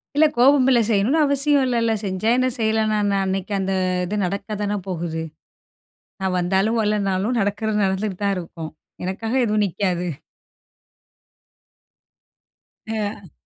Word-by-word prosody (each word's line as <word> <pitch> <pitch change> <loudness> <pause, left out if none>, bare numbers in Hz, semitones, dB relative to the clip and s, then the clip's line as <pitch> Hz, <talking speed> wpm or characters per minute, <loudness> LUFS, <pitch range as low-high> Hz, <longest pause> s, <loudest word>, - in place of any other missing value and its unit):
இல்ல 310 +1 +6
கோபம் 265 +1 +5
இல்ல. 245 -2 +5
செய்யணும்னு 225 +8 +2
அவசியம் 280 0 +2
இல்லல்ல, 230 -2 +1
செஞ்சா 190 +3 -1
என்ன 255 0 +2
செய்யலனா 220 -1 +1
என்ன? 200 -1 +1
அன்னைக்கு 190 +1 -2
அந்த 190 0 -1 0.3
இது 205 +4 -3
நடக்கத்தானே 205 +2 -3
போகுது. 165 -2 -3 1.0
நான் 190 -1 -1
வந்தாலும் 195 +6 +1
வரலைன்னாலும் 210 +2 0
நடக்குறது 210 +1 0
நடந்துட்டு 190 0 -1
தான் 200 -1 +2
இருக்கும். 165 -2 -6 0.3
எனக்காக 220 +6 -3
எதுவும் 210 -1 +2
நிக்காது. 180 -1 -1 2.8
அ. 210 -5 -4
205 Hz, 115 wpm, -22 LUFS, 190-225 Hz, 2.8 s, இல்ல